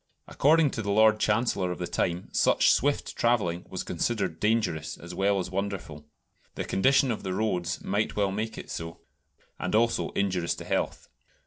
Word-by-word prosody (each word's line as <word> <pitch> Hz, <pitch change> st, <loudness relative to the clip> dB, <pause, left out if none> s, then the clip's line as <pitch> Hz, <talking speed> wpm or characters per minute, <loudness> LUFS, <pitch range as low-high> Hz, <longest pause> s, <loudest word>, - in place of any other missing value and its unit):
According 155 Hz, 0 st, +3 dB
to 110 Hz, -, -3 dB
the 100 Hz, -, -4 dB
Lord 110 Hz, +1 st, +5 dB
Chancellor 105 Hz, -4 st, +1 dB
of 90 Hz, -, -4 dB
the 90 Hz, -, -3 dB
time 85 Hz, +1 st, -2 dB
such -, -, +4 dB
swift 145 Hz, +2 st, 0 dB
travelling 105 Hz, -8 st, 0 dB
was -, -, -4 dB
considered 100 Hz, -8 st, -2 dB
dangerous 105 Hz, -8 st, 0 dB
as 85 Hz, +1 st, -10 dB
well 100 Hz, +2 st, +1 dB
as 90 Hz, -1 st, -3 dB
wonderful 95 Hz, -6 st, -4 dB, 0.5 s
the -, -, -3 dB
condition 130 Hz, +5 st, +3 dB
of 110 Hz, -, -3 dB
the 95 Hz, -1 st, -3 dB
roads 90 Hz, -5 st, -1 dB
might 105 Hz, +3 st, -1 dB
well 100 Hz, -2 st, +1 dB
make 110 Hz, +3 st, -3 dB
it -, -, -8 dB
so 80 Hz, 0 st, -6 dB, 0.6 s
and -, -, -1 dB
also 115 Hz, +1 st, +2 dB
injurious 95 Hz, -4 st, 0 dB
to -, -, -9 dB
health. -, -, -2 dB
100 Hz, 175 wpm, -27 LUFS, 90-110 Hz, 0.6 s, Lord